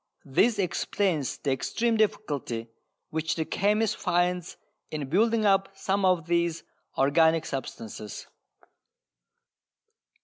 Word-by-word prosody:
This 205 Hz, -, +3 dB
explains 180 Hz, -5 st, 0 dB
the 140 Hz, -, -2 dB
extreme 225 Hz, -, 0 dB
difficulty 145 Hz, -, -1 dB, 0.4 s
which 160 Hz, 0 st, -1 dB
the 160 Hz, -, -1 dB
chemist 210 Hz, +4 st, +1 dB
finds 180 Hz, -1 st, 0 dB, 0.3 s
in 150 Hz, -3 st, -4 dB
building 220 Hz, +6 st, +3 dB
up 195 Hz, -1 st, +2 dB
some 195 Hz, 0 st, 0 dB
of 180 Hz, -4 st, +3 dB
these 170 Hz, -1 st, 0 dB, 0.3 s
organic 160 Hz, +4 st, +4 dB
substances. 110 Hz, -5 st, -6 dB
175 Hz, 100 wpm, -27 LUFS, 150-200 Hz, 0.4 s, organic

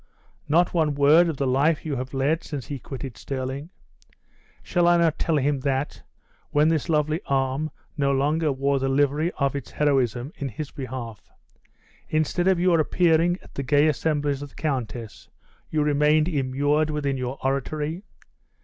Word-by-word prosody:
not 170 Hz, +4 st, +3 dB
one 155 Hz, -4 st, +1 dB
word 155 Hz, +5 st, +5 dB
of 155 Hz, -, -3 dB
the 140 Hz, -, 0 dB
life 140 Hz, +5 st, +2 dB
you 150 Hz, -3 st, -2 dB
have 130 Hz, 0 st, -4 dB
led 140 Hz, +5 st, 0 dB
since 140 Hz, -5 st, -6 dB
he 140 Hz, -2 st, -5 dB
quitted 130 Hz, -1 st, -7 dB
Stirling? 135 Hz, +3 st, -4 dB, 0.9 s
Shall 175 Hz, -1 st, +1 dB
I 175 Hz, 0 st, +5 dB
not 165 Hz, -2 st, +2 dB
tell 160 Hz, -2 st, +1 dB
him 140 Hz, 0 st, +1 dB
that, 135 Hz, +1 st, -2 dB, 0.5 s
when 150 Hz, +2 st, +3 dB
this 160 Hz, -2 st, 0 dB
lovely 155 Hz, +1 st, +1 dB
arm 135 Hz, +2 st, 0 dB, 0.3 s
no 140 Hz, -2 st, +1 dB
longer 150 Hz, +3 st, +1 dB
wore 140 Hz, +1 st, 0 dB
the 135 Hz, 0 st, -1 dB
livery 145 Hz, +4 st, +1 dB
of 140 Hz, -1 st, 0 dB
its 140 Hz, -, -5 dB
heroism 135 Hz, -2 st, 0 dB
in 140 Hz, -, -3 dB
his 140 Hz, +5 st, -6 dB
behalf, 125 Hz, -6 st, -7 dB, 0.8 s
instead 155 Hz, +3 st, 0 dB
of 190 Hz, -2 st, +3 dB
your 175 Hz, -2 st, +3 dB
appearing 170 Hz, +2 st, +3 dB
at -, -, -17 dB
the -, -, -3 dB
gay 145 Hz, +3 st, +3 dB
assemblies 145 Hz, 0 st, 0 dB
of 145 Hz, -, -7 dB
the -, -, -24 dB
countess, 125 Hz, -7 st, -4 dB, 0.4 s
you 155 Hz, -1 st, +1 dB
remained 150 Hz, +1 st, +3 dB
immured 145 Hz, 0 st, +1 dB
within 145 Hz, -2 st, -1 dB
your 130 Hz, +1 st, -4 dB
oratory? 150 Hz, +5 st, -2 dB
145 Hz, 165 wpm, -24 LUFS, 135-155 Hz, 0.9 s, word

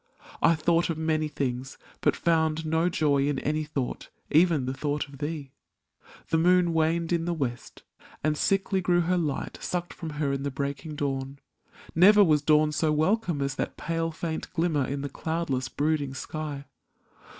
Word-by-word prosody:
I 165 Hz, -, +5 dB
thought 165 Hz, +2 st, +2 dB
of 165 Hz, -, -1 dB
many 160 Hz, -1 st, 0 dB
things, 130 Hz, -3 st, -3 dB, 0.2 s
but -, -, +3 dB
found 160 Hz, -1 st, +1 dB
no 160 Hz, +2 st, +2 dB
joy 145 Hz, -4 st, +2 dB
In 145 Hz, -2 st, 0 dB
any 155 Hz, +3 st, -1 dB
thought, 145 Hz, -4 st, -4 dB, 0.2 s
even 160 Hz, -4 st, +4 dB
the 130 Hz, -, -2 dB
thought 145 Hz, +2 st, -2 dB
of 140 Hz, -1 st, -13 dB
thee; 145 Hz, -3 st, -4 dB, 0.8 s
The 160 Hz, -, +2 dB
moon 175 Hz, 0 st, +4 dB
waned 165 Hz, +1 st, +1 dB
in 165 Hz, -1 st, 0 dB
the 175 Hz, 0 st, -1 dB
west 125 Hz, -6 st, -5 dB, 0.4 s
and 155 Hz, 0 st, +2 dB
sickly 195 Hz, +3 st, +1 dB
grew 175 Hz, -1 st, +3 dB
Her 180 Hz, +2 st, +1 dB
light 150 Hz, -5 st, -3 dB
sucked 175 Hz, -1 st, -3 dB
from 165 Hz, -, -6 dB
her 145 Hz, -2 st, 0 dB
in 135 Hz, -, -2 dB
the 140 Hz, -, -1 dB
breaking 140 Hz, +3 st, -4 dB
dawn 135 Hz, -1 st, -3 dB, 0.3 s
— -, -, -21 dB
Never 205 Hz, +5 st, +7 dB
was 155 Hz, -5 st, +3 dB
dawn 150 Hz, +1 st, +4 dB
so 155 Hz, +1 st, +1 dB
welcome 160 Hz, 0 st, +1 dB
as 140 Hz, 0 st, -1 dB
that -, -, -3 dB
pale, 165 Hz, 0 st, -1 dB
Faint 160 Hz, 0 st, -4 dB
glimmer 160 Hz, -5 st, +1 dB
in 140 Hz, 0 st, -3 dB
the 145 Hz, -, -3 dB
cloudless, 140 Hz, -3 st, -2 dB
brooding 145 Hz, -2 st, -1 dB
sky! 145 Hz, 0 st, -5 dB
155 Hz, 175 wpm, -27 LUFS, 140-165 Hz, 0.8 s, Never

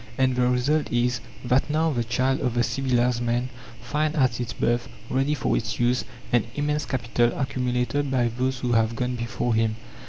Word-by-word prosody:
And 130 Hz, -1 st, +2 dB
the 125 Hz, 0 st, +2 dB
result 140 Hz, +5 st, +1 dB
is, 120 Hz, -1 st, +1 dB, 0.2 s
that 125 Hz, +4 st, +2 dB
now 160 Hz, +2 st, +2 dB
the 120 Hz, -4 st, 0 dB
child 130 Hz, +4 st, 0 dB
of 125 Hz, -3 st, -1 dB
the 120 Hz, -, +3 dB
civilized 125 Hz, -1 st, +1 dB
man 120 Hz, +1 st, 0 dB, 0.3 s
finds 150 Hz, +5 st, -1 dB
at 125 Hz, -4 st, +2 dB
its 120 Hz, -1 st, -3 dB
birth, 120 Hz, +3 st, 0 dB, 0.2 s
ready 135 Hz, +3 st, +1 dB
for 135 Hz, -, 0 dB
its 110 Hz, -2 st, -2 dB
use, 120 Hz, +1 st, +2 dB, 0.3 s
an 120 Hz, -3 st, +4 dB
immense 150 Hz, 0 st, -1 dB
capital 120 Hz, -1 st, 0 dB
accumulated 130 Hz, 0 st, 0 dB
by 125 Hz, -3 st, +2 dB
those 130 Hz, +1 st, -1 dB
who 125 Hz, -, -1 dB
have 115 Hz, 0 st, +2 dB
gone 125 Hz, +2 st, -1 dB
before 120 Hz, 0 st, -1 dB
him. 110 Hz, -1 st, +1 dB
125 Hz, 185 wpm, -25 LUFS, 120-135 Hz, 0.3 s, an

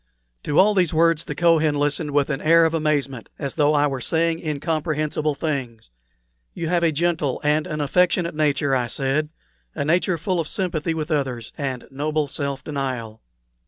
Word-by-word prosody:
To 145 Hz, -, -1 dB
all 210 Hz, +3 st, +6 dB
these 180 Hz, -5 st, +1 dB
words 165 Hz, 0 st, +3 dB
the -, -, -5 dB
Kohen 160 Hz, -3 st, +3 dB
listened 145 Hz, +1 st, 0 dB
with 145 Hz, 0 st, +1 dB
an 135 Hz, -, -3 dB
air 165 Hz, +1 st, +5 dB
of 160 Hz, -, 0 dB
amazement, 145 Hz, -6 st, -1 dB
as 140 Hz, -3 st, -4 dB
though 150 Hz, 0 st, +2 dB
I 145 Hz, 0 st, +3 dB
were 135 Hz, -3 st, -2 dB
saying 165 Hz, +4 st, +1 dB
incomprehensible 155 Hz, -1 st, -1 dB
things. 130 Hz, -, -4 dB, 0.6 s
"You 165 Hz, -2 st, -3 dB
have 175 Hz, -1 st, +2 dB
a 165 Hz, -1 st, +3 dB
gentle 160 Hz, -3 st, 0 dB
and 150 Hz, +1 st, +1 dB
an 150 Hz, 0 st, -3 dB
affectionate 175 Hz, +3 st, +2 dB
nature," 145 Hz, -2 st, +1 dB
I 125 Hz, -2 st, 0 dB
said 140 Hz, +4 st, -1 dB, 0.5 s
"a -, -, -2 dB
nature 175 Hz, +3 st, +2 dB
full 180 Hz, +2 st, -1 dB
of 160 Hz, -, -2 dB
sympathy 170 Hz, -5 st, -2 dB
with 155 Hz, 0 st, -4 dB
others, 130 Hz, -6 st, -2 dB
and 130 Hz, -3 st, -4 dB
noble 150 Hz, +2 st, -1 dB
self 140 Hz, -1 st, -3 dB
denial." 130 Hz, -7 st, -4 dB
150 Hz, 175 wpm, -22 LUFS, 140-165 Hz, 0.6 s, all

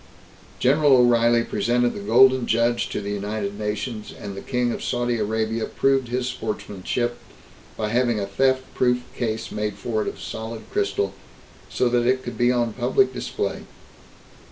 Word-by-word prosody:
General 140 Hz, +1 st, +4 dB
O'Reilly 120 Hz, -1 st, +4 dB
presented 120 Hz, +3 st, +1 dB
the -, -, -6 dB
Golden 125 Hz, +4 st, +5 dB
Judge 115 Hz, +1 st, +1 dB
to -, -, -3 dB
the 100 Hz, 0 st, -4 dB
United 100 Hz, 0 st, -3 dB
Nations, 105 Hz, +1 st, -4 dB
and 100 Hz, -1 st, -8 dB
the 100 Hz, -, -6 dB
King 125 Hz, -2 st, 0 dB
of -, -, -5 dB
Saudi 120 Hz, -1 st, 0 dB
Arabia 110 Hz, +1 st, -1 dB
proved 135 Hz, -2 st, +1 dB
his 125 Hz, +1 st, -1 dB
sportsmanship 120 Hz, 0 st, -3 dB, 0.6 s
by 105 Hz, -1 st, -1 dB
having 120 Hz, -1 st, +1 dB
a 100 Hz, -, -1 dB
theft 130 Hz, +6 st, +1 dB
proof 125 Hz, -1 st, +1 dB
case 110 Hz, -2 st, -3 dB
made 105 Hz, 0 st, -2 dB
for 110 Hz, -2 st, -2 dB
it -, -, -3 dB
of -, -, -5 dB
solid 110 Hz, 0 st, -6 dB
crystal, 410 Hz, 0 st, 0 dB, 0.6 s
so 125 Hz, -, +1 dB
that 120 Hz, 0 st, +2 dB
it 130 Hz, 0 st, +2 dB
could 120 Hz, -, -6 dB
be 120 Hz, 0 st, +3 dB
on 120 Hz, -2 st, 0 dB
public 400 Hz, -, +2 dB
display. -, -, -3 dB
120 Hz, 160 wpm, -23 LUFS, 110-125 Hz, 0.6 s, Golden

